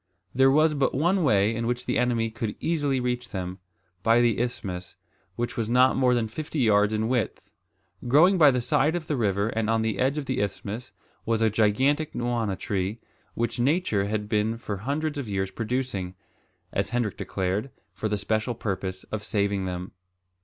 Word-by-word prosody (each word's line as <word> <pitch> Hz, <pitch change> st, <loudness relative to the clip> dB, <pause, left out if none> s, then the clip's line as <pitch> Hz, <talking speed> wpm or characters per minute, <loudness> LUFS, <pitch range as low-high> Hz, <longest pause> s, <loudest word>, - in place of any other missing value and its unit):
There 135 Hz, +2 st, +5 dB
was 155 Hz, +3 st, +4 dB
but 140 Hz, -2 st, +1 dB
one 175 Hz, +6 st, +2 dB
way 105 Hz, -5 st, +3 dB
in 115 Hz, +1 st, -2 dB
which 125 Hz, +1 st, -2 dB
the -, -, 0 dB
enemy 120 Hz, -2 st, +1 dB
could 110 Hz, -1 st, -4 dB
easily 145 Hz, -5 st, 0 dB
reach 125 Hz, -1 st, -2 dB
them, 95 Hz, -1 st, -5 dB, 0.4 s
by 115 Hz, +3 st, +4 dB
the 120 Hz, -3 st, +2 dB
isthmus, 95 Hz, -7 st, -4 dB, 0.4 s
which 120 Hz, 0 st, -3 dB
was 115 Hz, -2 st, -2 dB
not 125 Hz, +2 st, +5 dB
more 125 Hz, -2 st, +3 dB
than 115 Hz, -2 st, 0 dB
fifty 155 Hz, +7 st, -6 dB
yards 105 Hz, -5 st, +4 dB
in 110 Hz, 0 st, 0 dB
width. 120 Hz, -4 st, -2 dB, 0.6 s
Growing 170 Hz, +9 st, +5 dB
by 150 Hz, -3 st, +8 dB
the 125 Hz, -2 st, +1 dB
side 150 Hz, +7 st, +2 dB
of 170 Hz, -3 st, -3 dB
the 155 Hz, -, -1 dB
river 100 Hz, -3 st, +1 dB
and 110 Hz, -1 st, -1 dB
on 115 Hz, 0 st, +2 dB
the 110 Hz, -3 st, -1 dB
edge 135 Hz, +3 st, +1 dB
of 150 Hz, -, -2 dB
the 130 Hz, -1 st, -1 dB
isthmus, 105 Hz, +4 st, -4 dB, 0.3 s
was 115 Hz, -1 st, 0 dB
a 110 Hz, -, +3 dB
gigantic 130 Hz, +9 st, +2 dB
nwana 120 Hz, -5 st, -1 dB
tree, 100 Hz, +3 st, -2 dB, 0.4 s
which 120 Hz, +2 st, -2 dB
nature 130 Hz, -, +1 dB
had 105 Hz, 0 st, -2 dB
been 110 Hz, +1 st, 0 dB
for 105 Hz, -4 st, -5 dB
hundreds 145 Hz, +7 st, -2 dB
of 125 Hz, -6 st, -5 dB
years 95 Hz, -1 st, -1 dB
producing, 115 Hz, -6 st, -3 dB, 0.6 s
as -, -, 0 dB
Hendrik 120 Hz, -5 st, -1 dB
declared, 95 Hz, +6 st, -2 dB, 0.2 s
for 110 Hz, -, -3 dB
the 105 Hz, -, 0 dB
special 110 Hz, +3 st, -1 dB
purpose 95 Hz, -3 st, -4 dB
of 110 Hz, -1 st, -3 dB
saving 100 Hz, -2 st, 0 dB
them. 90 Hz, 0 st, -5 dB
115 Hz, 185 wpm, -26 LUFS, 105-130 Hz, 0.6 s, by